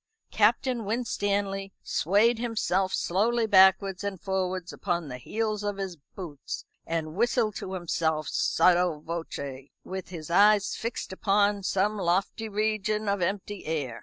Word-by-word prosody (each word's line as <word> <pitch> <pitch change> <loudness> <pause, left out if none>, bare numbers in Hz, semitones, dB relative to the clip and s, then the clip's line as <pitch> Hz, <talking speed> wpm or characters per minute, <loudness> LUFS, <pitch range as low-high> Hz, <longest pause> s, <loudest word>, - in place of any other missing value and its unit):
Captain 235 +3 +2
Winstanley 200 -3 -1
swayed 215 +7 +2
himself 205 -5 0
slowly 225 +7 +1
backwards 190 -1 +5
and 200 -2 -3
forwards 185 -2 -2
upon 175 -4 -2
the 125 0 -6
heels 215 - -2
of 205 -1 -2
his 190 -3 -4
boots, 150 -1 -8 0.2
and 160 -1 -2
whistled 225 +1 +1
to 190 - -6
himself 160 -4 -1
sotto 175 +1 +3
voce, 140 -5 -6
with 190 0 -6
his 170 -3 -7
eyes 205 +2 +5
fixed 230 -4 -4
upon 200 +1 +2
some 200 +2 0
lofty 195 +5 0
region 215 0 0
of 200 -1 0
empty 200 +2 -2
air. 145 -7 -2
195 Hz, 135 wpm, -27 LUFS, 175-210 Hz, 0.2 s, backwards